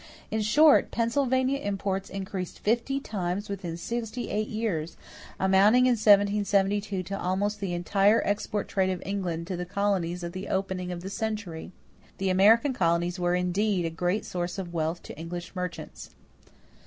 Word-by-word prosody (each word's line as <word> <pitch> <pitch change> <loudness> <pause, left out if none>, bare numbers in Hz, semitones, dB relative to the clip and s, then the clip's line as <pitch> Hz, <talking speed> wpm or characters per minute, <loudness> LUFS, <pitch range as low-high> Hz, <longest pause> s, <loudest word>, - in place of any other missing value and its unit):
In 220 - 0
short, 290 +8 +5
Pennsylvania 260 +3 +1
imports 195 -4 -2
increased 190 -2 -5
fifty 240 +5 0
times 200 -4 -3
within 180 -4 -4
sixty 235 +5 -4
eight 215 +1 -1
years, 185 -8 -3 0.4
amounting 200 +6 +5
in 255 - +4
1772 205 -2 +3
to 195 +2 -5
almost 200 +3 -1
the 190 -3 -2
entire 200 +5 +3
export 205 0 -1
trade 190 -1 +1
of 185 -2 -3
England 180 -4 -3
to 185 +1 -4
the 175 - -3
colonies 180 -2 -1
at 170 0 -5
the 185 +2 -6
opening 190 -2 -2
of 175 -1 -5
the 190 +2 -6
century. 210 -7 -4 0.5
The 190 -1 0
American 225 +9 +5
colonies 175 -2 +1
were 175 0 +1
indeed 180 +1 0
a 165 - -2
great 180 +5 -1
source 175 +1 -3
of 180 -3 -5
wealth 165 +1 -2
to - - -9
English 175 +2 -6
merchants. 180 -1 -6
195 Hz, 155 wpm, -27 LUFS, 180-210 Hz, 0.5 s, short